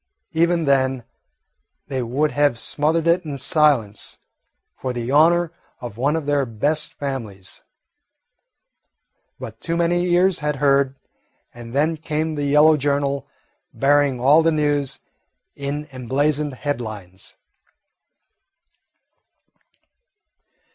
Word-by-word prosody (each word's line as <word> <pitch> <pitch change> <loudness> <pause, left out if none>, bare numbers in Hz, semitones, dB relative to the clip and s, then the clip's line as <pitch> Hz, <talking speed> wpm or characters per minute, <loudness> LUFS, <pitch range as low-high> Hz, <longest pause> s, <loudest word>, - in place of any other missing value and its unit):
Even 170 +1 +2
then 130 -2 +1 0.8
they 135 -2 -3
would 135 +6 0
have 145 -4 +2
smothered 155 +6 0
it 170 +2 +3
in 145 -3 -5
silence, 135 -6 +1 0.6
for 130 -1 -4
the 120 +1 -4
honour 165 +3 +4 0.3
of 120 -4 -8
one 140 +6 0
of 160 -3 -3
their 145 -1 +1
best 145 +6 -2
families; 110 -9 -6 1.8
but - - -9
too 170 - -2
many 175 +1 +1
ears 180 +1 +3
had 150 -1 -1
heard, 140 -1 +2 0.6
and 120 +1 -10
then 155 +3 +1
came 155 +1 -2
the 145 -1 -2
yellow 150 +2 +5
journal 140 -1 -1 0.5
bearing 140 -2 +2
all 145 +6 +5
the 165 0 +2
news 145 -3 -1 0.5
in 145 +2 -4
emblazoned 140 +3 -1
headlines. 110 -10 -6
145 Hz, 105 wpm, -21 LUFS, 130-155 Hz, 1.8 s, yellow